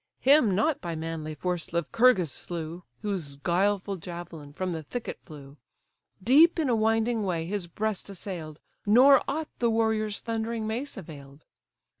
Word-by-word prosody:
Him 260 -8 +5
not 275 +9 +1
by 170 -2 -4
manly 160 -1 -5
force 175 +2 -3
Lycurgus 180 - +3
slew, 170 +4 -6 0.2
Whose 180 -9 -3
guileful 190 +6 0
javelin 170 -4 -8
from 185 +5 -3
the 165 -2 -3
thicket 225 +11 -6
flew, 145 -4 -12 0.7
Deep 305 - +6
in 310 -5 +1
a 240 - +3
winding 225 +1 +1
way 170 -4 -1
his 190 0 -3
breast 210 +3 -3
assailed, 175 -5 -6 0.2
Nor 255 +6 +7
aught 305 +3 -2
the 235 - +2
warrior's 220 -2 +1
thundering 225 0 -3
mace 240 +6 -4
avail'd. 145 -5 -11
195 Hz, 145 wpm, -27 LUFS, 165-225 Hz, 0.7 s, Nor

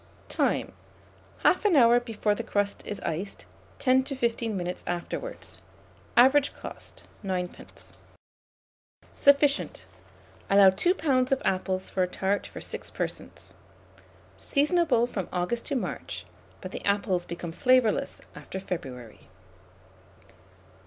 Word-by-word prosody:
Time. - - 0 0.7
1/2 415 -5 +4
hour 240 -1 +7
before 225 -3 -1
the - - -3
crust 205 0 -1
is 205 - -4
iced; 170 +5 -4 0.3
10 260 0 +4
to 275 - -3
15 235 -4 -1
minutes 180 0 -4
afterwards. 175 - -5 0.6
Average 270 +3 +5
cost, - - -10 0.2
9d. 180 -2 -5 1.2
Sufficient. 280 0 +3 0.6
Allow 195 -1 +7
2 350 - +2
lbs. 260 -7 +1
of 270 - +3
apples 185 0 -1
for 190 - 0
a 180 - +3
tart 190 +2 -1
for - - -9
6 - - -5
persons. - - -5 0.9
Seasonable 295 -4 +2
from 200 -7 -4
August 180 +7 -1
to 285 - -1
March; 250 - -4 0.4
but - - -7
the - - -6
apples 200 -3 +1
become 170 0 -6
flavourless 250 +4 +2
after 190 - -7
February. 130 - -7
210 Hz, 115 wpm, -27 LUFS, 185-260 Hz, 1.2 s, hour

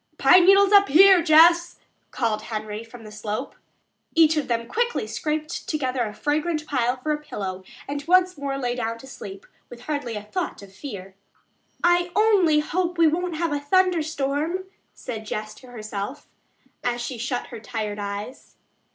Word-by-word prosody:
"Pine 360 0 +6
needles 395 +1 +6
up 400 -1 +7
here, 375 +4 +7
Jess," 335 +2 +5 0.3
called 225 -4 -1
Henry 215 0 -5
from 230 0 -13
the 215 - -11
slope. 215 +4 -5 0.6
Each 320 -1 +5
of 300 - -1
them 235 -1 -1
quickly 475 - -1
scraped 305 -5 -4
together 260 -4 -1
a 210 - -5
fragrant 305 +4 -1
pile 255 -3 0
for 305 +5 -3
a 300 0 -2
pillow 190 -9 -6 0.2
and 285 0 -4
once 365 +1 +4
more 280 -1 -4
lay 245 -3 -2
down 230 -2 -3
to 230 - -13
sleep, 195 -7 -10 0.2
with 240 -1 -11
hardly 270 -4 -4
a 210 - -5
thought 340 - -4
of 195 -1 -14
fear. 195 -5 -8 0.7
"I 350 0 +3
only 390 -8 +4
hope 350 +3 -2
we 335 - +5
won't 340 +2 0
have 330 -1 -1
a 290 - -1
thunderstorm," 315 0 0 0.3
said 220 -3 -7
Jess 215 0 -4
to 255 - -16
herself, 215 0 -6 0.6
as 240 -1 -1
she 240 0 -5
shut 245 +1 -3
her - - -6
tired 215 -2 -5
eyes. 205 +4 -7
280 Hz, 170 wpm, -24 LUFS, 225-335 Hz, 0.7 s, up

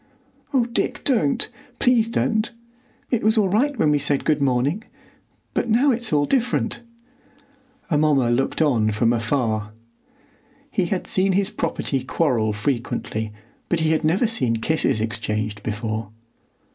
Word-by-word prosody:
"Oh, 260 -5 +2
Dick, 240 +2 -2
don't! 220 - +1 0.3
Please 245 -3 +3
don't! 220 -1 0 0.6
It 240 - +1
was 220 +2 +3
all 205 -3 +3
right 265 +8 +1
when 155 -7 +3
we 145 - +3
said 145 0 0
good 150 -2 +2
morning; 140 - +1 0.7
but - - -1
now 250 +6 +4
it's 240 0 0
all 145 -1 +3
different!" 245 - 0 1.1
Amomma 145 -5 +3
looked 135 +6 +1
on 115 -8 +2
from 115 +2 +2
afar. 110 -2 -1 1.0
He - - +1
had - - -2
seen 190 +1 +2
his 195 +1 +1
property 135 -2 -2
quarrel 125 -6 +1
frequently, 110 -1 -2 0.4
but 170 -2 +1
he 160 0 +2
had 160 0 +1
never 170 +9 +2
seen 130 - +1
kisses 115 -1 0
exchanged 105 -1 -2
before. 110 0 -3
145 Hz, 140 wpm, -22 LUFS, -, 1.1 s, now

